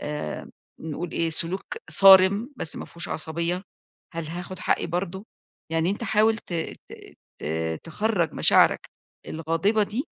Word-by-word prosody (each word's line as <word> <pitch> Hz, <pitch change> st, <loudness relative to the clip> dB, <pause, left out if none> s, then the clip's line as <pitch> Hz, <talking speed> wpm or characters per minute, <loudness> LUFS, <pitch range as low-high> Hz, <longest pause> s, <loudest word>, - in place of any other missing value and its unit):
آآ 150 Hz, -, -5 dB, 0.3 s
نقول 160 Hz, +2 st, -5 dB
إيه، 165 Hz, -1 st, 0 dB
سلوك 170 Hz, +4 st, +2 dB, 0.3 s
صارم، 195 Hz, -, +7 dB
بس 160 Hz, -, -1 dB
ما -, -, -6 dB
فيهوش 170 Hz, +1 st, -6 dB
عصبية، 170 Hz, +3 st, -2 dB, 0.5 s
هل 165 Hz, -1 st, -5 dB
هاخد 180 Hz, +3 st, -7 dB
حقي -, -, 0 dB
برضه؟ 180 Hz, +3 st, -4 dB, 0.5 s
يعني 165 Hz, +2 st, +1 dB
أنت 210 Hz, +3 st, -3 dB
حاول 220 Hz, +2 st, +3 dB
ت 180 Hz, -, -12 dB, 0.4 s
ت -, -, -9 dB, 0.5 s
ت -, -, -5 dB, 0.4 s
تخرّج 175 Hz, -1 st, -1 dB
مشاعرك -, -, +4 dB, 0.4 s
الغاضبة 165 Hz, +7 st, 0 dB
دي 220 Hz, +7 st, -2 dB
175 Hz, 135 wpm, -25 LUFS, 165-200 Hz, 0.5 s, صارم